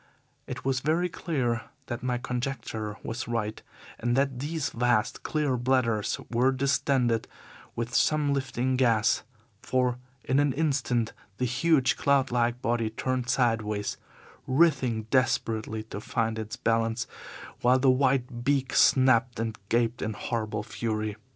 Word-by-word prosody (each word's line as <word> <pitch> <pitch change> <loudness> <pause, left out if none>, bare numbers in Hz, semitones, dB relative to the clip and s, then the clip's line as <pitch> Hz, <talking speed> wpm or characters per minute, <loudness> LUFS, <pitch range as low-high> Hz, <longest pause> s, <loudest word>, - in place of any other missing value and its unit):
It - - -6
was 135 -1 +1
very 160 +6 +1
clear 125 -9 -1 0.2
that 120 0 -5
my 125 -1 -1
conjecture 120 -4 -4
was 120 +3 -4
right, 110 -2 -2 0.4
and 120 +2 0
that 135 -2 +1
these 150 +1 -2
vast, 120 -2 +1
clear 150 -4 0
bladders 120 -4 +1
were 125 +3 +3
distended 130 -3 +1 0.5
with 120 +1 -3
some 150 -2 +3
lifting 130 -1 -1
gas, 115 -4 +3 0.4
for 125 -1 0 0.2
in 130 +3 +2
an 145 -2 +2
instant 130 -6 0 0.2
the 125 - 0
huge, 130 +2 +2
cloud 140 -2 +2
like 120 0 0
body 115 -1 +1
turned 125 +2 -2
sideways, 110 -4 0 0.5
writhing 130 -6 +2
desperately 115 -4 0
to 105 -2 -7
find 110 0 -1
its 110 -1 -5
balance, 115 0 0 0.6
while 125 +1 +5
the 130 0 +4
white 130 -2 +1
beak 135 -1 +1
snapped 130 -3 +4
and 115 -1 -3
gaped 120 0 +1
in 110 - -2
horrible 110 -2 -3
fury. 110 -1 -3
125 Hz, 135 wpm, -28 LUFS, 115-135 Hz, 0.6 s, while